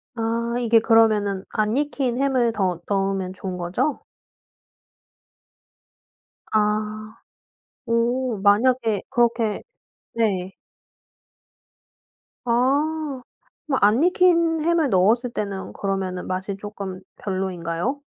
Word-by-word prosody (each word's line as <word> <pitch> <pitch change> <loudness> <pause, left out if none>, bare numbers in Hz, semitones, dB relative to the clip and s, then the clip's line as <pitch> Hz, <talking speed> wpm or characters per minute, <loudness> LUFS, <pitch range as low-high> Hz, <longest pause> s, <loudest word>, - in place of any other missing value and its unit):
아 230 +1 -1
이게 230 -1 +3
그러면은 215 -4 +3
안 215 +1 0
익힌 270 -4 -1
햄을 255 -4 +2
더 185 -5 -1
넣으면 195 -2 -1
좋은 185 -1 -6
거죠? 180 - -2 2.5
아. 215 0 -1 0.7
오. 235 +1 0
만약에 220 0 +3
그렇게 235 -3 +1 0.5
네. 195 -5 0 1.9
아. 280 +4 0 0.4
뭐 275 -4 0
안 215 +8 +4
익힌 335 -2 +3
햄을 325 -2 +2
넣었을 230 +6 +2
때는 200 -4 -4
그러면은 190 -2 -3
맛이 190 +2 -3
쪼끔 200 -2 -7 0.2
별로인가요? 185 - -3
220 Hz, 180 characters per minute, -23 LUFS, 195-255 Hz, 2.5 s, 안